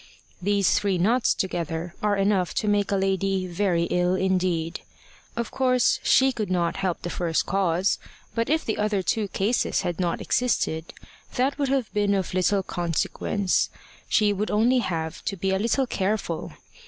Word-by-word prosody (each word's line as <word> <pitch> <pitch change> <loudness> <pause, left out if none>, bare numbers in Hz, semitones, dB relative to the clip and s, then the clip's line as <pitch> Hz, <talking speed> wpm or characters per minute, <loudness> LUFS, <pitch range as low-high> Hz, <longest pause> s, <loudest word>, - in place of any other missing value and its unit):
These 200 0 +2
three 200 -3 0
nots 230 +7 +2
together 170 -2 -3
are 210 -1 +1
enough 195 -2 +1
to 215 - -1
make 205 -1 +1
a - - +2
lady 195 0 0
very 175 -1 0
ill 180 +1 +2
indeed. 180 -3 0 0.5
Of 235 -1 -3
course 255 -1 +2
she 265 +1 +4
could 220 -5 -3
not 175 -2 0
help 185 -3 -2
the 175 - -3
first 165 -2 0
cause; 190 -1 +1 0.3
but 230 +2 -1
if 315 +2 +1
the 220 - -2
other 210 -2 0
two 210 +4 0
causes 205 +5 0
had 175 -2 -3
not 175 -2 0
existed, 175 -9 0 0.4
that 270 +3 0
would 280 -2 +1
have 265 -4 0
been 205 -1 +2
of 190 -2 -2
little 190 +2 +2
consequence; 180 +3 0 0.4
she 210 -2 +3
would 205 +2 -2
only 235 +5 +3
have 160 -7 -3
to 195 - -2
be 190 +2 -1
a 190 - +1
little 235 +5 +1
careful. 195 -6 -2
195 Hz, 165 wpm, -25 LUFS, 180-215 Hz, 0.5 s, she